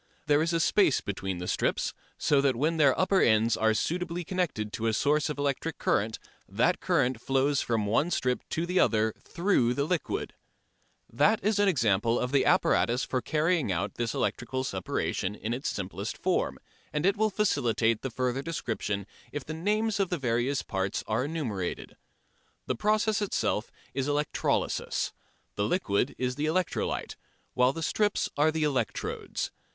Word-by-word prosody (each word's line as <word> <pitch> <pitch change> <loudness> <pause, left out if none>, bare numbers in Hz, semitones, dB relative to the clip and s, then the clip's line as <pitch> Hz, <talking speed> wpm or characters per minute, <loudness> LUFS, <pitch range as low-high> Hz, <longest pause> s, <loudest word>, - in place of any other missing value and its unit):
There 145 0 +3
is 165 +1 +1
a 165 - +1
space 165 -2 +4
between 95 -2 -4
the 90 0 -5
strips, - - 0 0.2
so 145 -2 +3
that 135 -3 +2
when 155 +7 0
their 140 -4 +4
upper 190 +1 +3
ends 110 0 +4
are 110 0 +2
suitably 175 +5 -2
connected 155 - -2
to 115 - -2
a 110 - +1
source 150 +6 +2
of 150 - -3
electric 145 +3 -1
current 110 +2 0 0.3
that 120 - +2
current 130 -9 +1
flows 135 +2 +1
from 115 -3 0
one 115 +11 +2
strip 125 -7 0
to 165 - -1
the 180 +1 +1
other 110 0 +3
through 170 -10 +1
the 140 - +1
liquid. 175 0 -2 0.7
That 210 - +3
is 210 0 +2
an 205 - +4
example 115 - +2
of 125 - -2
the 140 - +3
apparatus 125 +2 +3
for 130 0 -1
carrying 155 - +1
out 85 - -1
this 120 -1 -2
electrical 130 +2 -1
separation 95 -1 -2
in 110 +2 -3
its 130 +4 -2
simplest 95 -1 -4
form, - - 0 0.3
and 150 +2 -1
it 195 +1 +4
will 215 0 +2
facilitate 120 - +1
the 135 - -3
further 125 +2 -1
description 110 - -3 0.3
if 145 -2 -5
the 155 - -5
names 210 +5 0
of 195 -2 +1
various 130 -4 0
parts 95 -1 -2
are 110 +4 0
enumerated. 120 - -4 0.7
The - - 0
process 215 - +1
itself 150 - -1 0.2
is 135 0 -1
electrolysis; 145 0 0 0.4
the 100 - -1
liquid 120 - 0
is 125 +1 -2
the 150 - 0
electrolyte, 180 +3 -1 0.4
while 125 +1 +4
the 165 +3 -5
strips 205 +4 +1
are 150 +2 +4
the 160 0 -1
electrodes. 125 -9 -2
135 Hz, 165 wpm, -28 LUFS, 115-165 Hz, 0.7 s, space